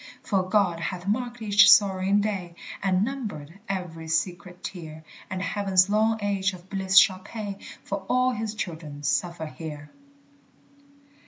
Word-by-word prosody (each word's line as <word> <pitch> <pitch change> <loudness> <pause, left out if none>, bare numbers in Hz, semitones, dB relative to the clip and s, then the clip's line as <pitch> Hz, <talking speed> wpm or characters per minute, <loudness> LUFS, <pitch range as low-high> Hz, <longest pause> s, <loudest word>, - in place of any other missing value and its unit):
For 190 -3 0
God 190 -5 +2
hath 175 +1 -4
marked 240 +3 -2
each 200 -1 +6
sorrowing 195 0 +5
day 190 -5 -3 0.3
And 190 0 +2
numbered 200 - -6
every 175 -4 -4
secret 175 +2 -2
tear, 160 -4 -8 0.3
And 185 -2 -3
heaven's 195 -2 +2
long 220 +1 +3
age 195 -1 0
of 180 +1 -13
bliss 190 -1 +1
shall 190 -3 +7
pay 200 0 -7 0.2
For 200 - -3
all 255 0 +3
his 220 -2 -4
children 160 -7 -6
suffer 165 +3 -1
here. 150 -2 -8
190 Hz, 140 wpm, -26 LUFS, 175-205 Hz, 0.3 s, shall